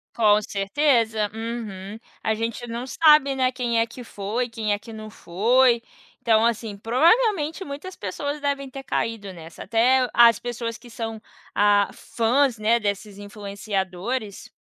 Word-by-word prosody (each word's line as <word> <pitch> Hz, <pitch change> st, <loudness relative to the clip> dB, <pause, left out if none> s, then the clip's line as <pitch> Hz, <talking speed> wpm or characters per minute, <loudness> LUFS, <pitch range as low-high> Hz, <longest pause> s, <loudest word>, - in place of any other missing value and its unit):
Com 210 Hz, -2 st, +4 dB
certeza, 220 Hz, +1 st, +1 dB
uhum. 220 Hz, -3 st, -6 dB, 0.2 s
A 220 Hz, -, +1 dB
gente 230 Hz, +2 st, -4 dB
não 235 Hz, +3 st, -5 dB
sabe 300 Hz, -3 st, +5 dB
né, 255 Hz, -1 st, +1 dB
quem 240 Hz, -2 st, -1 dB
é 230 Hz, -, +3 dB
que 245 Hz, +2 st, -11 dB
foi, 225 Hz, +4 st, -3 dB
quem 215 Hz, -2 st, -1 dB
é 205 Hz, -, -2 dB
que 230 Hz, -, -12 dB
não 215 Hz, -1 st, -8 dB
foi. 235 Hz, +7 st, +2 dB, 0.4 s
Então, 225 Hz, -1 st, +3 dB
assim, 225 Hz, -2 st, -1 dB
provavelmente 320 Hz, -, +2 dB
muitas 295 Hz, +6 st, -8 dB
pessoas 285 Hz, +10 st, -4 dB
devem 280 Hz, -1 st, -2 dB
ter 270 Hz, +1 st, -8 dB
caído 220 Hz, -6 st, -3 dB
nessa, 165 Hz, -2 st, -10 dB
até 250 Hz, +5 st, +3 dB
as 235 Hz, -2 st, +6 dB
pessoas 235 Hz, -1 st, -4 dB
que 245 Hz, -, -15 dB
são, 225 Hz, -1 st, -6 dB, 0.3 s
ah, 205 Hz, 0 st, +4 dB
fãs 240 Hz, +2 st, +1 dB
né, 225 Hz, +2 st, +2 dB
desses 205 Hz, -1 st, -3 dB
influenciadores. 200 Hz, +1 st, -4 dB
230 Hz, 150 wpm, -23 LUFS, 205-255 Hz, 0.4 s, as